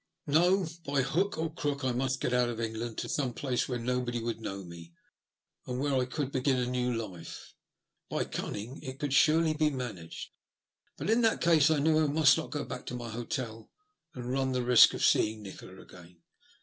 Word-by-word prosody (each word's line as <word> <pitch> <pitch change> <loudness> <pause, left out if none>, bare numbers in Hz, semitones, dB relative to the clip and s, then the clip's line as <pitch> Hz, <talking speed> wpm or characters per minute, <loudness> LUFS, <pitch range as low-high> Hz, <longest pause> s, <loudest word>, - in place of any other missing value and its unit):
No; 175 +6 +3 0.2
by 140 -3 +1
hook 180 +9 0
or 160 0 -2
crook 145 -4 -2
I 130 - +2
must 130 +1 -1
get 125 - 0
out 125 -1 +3
of 115 -1 -5
England 115 0 -4
to - - -3
some 130 -5 -1
place 130 -2 -1
where 125 - -1
nobody 120 0 -1
would 115 0 -4
know 100 -2 -5
me, 85 -1 -11 0.7
and 125 - -3
where 140 +1 0
I 130 -1 +2
could 130 +2 -3
begin 130 0 +1
a 125 - 0
new 125 0 -1
life. 100 -8 -6 0.6
By - - 0
cunning 115 +7 -5
it 130 0 -7
could 145 -1 -2
surely 155 +3 +4
be 155 0 +2
managed. 115 - -6 0.7
But - - -1
in 230 +2 +4
that 225 -1 +3
case 160 -3 +5
I 160 - +3
knew 155 +2 +3
I - - +2
must 150 0 +5
not 160 - -4
go 145 -1 -3
back 125 0 -7
to 125 - -4
my 120 -1 -6
hotel, 115 0 -5 0.5
and 125 -1 -5
run 135 0 0
the 125 -1 -1
risk 125 -1 +7
of - - +1
seeing 110 0 +2
Nikola 95 -1 -10
again. 85 -1 -15
125 Hz, 200 wpm, -30 LUFS, 115-145 Hz, 0.7 s, risk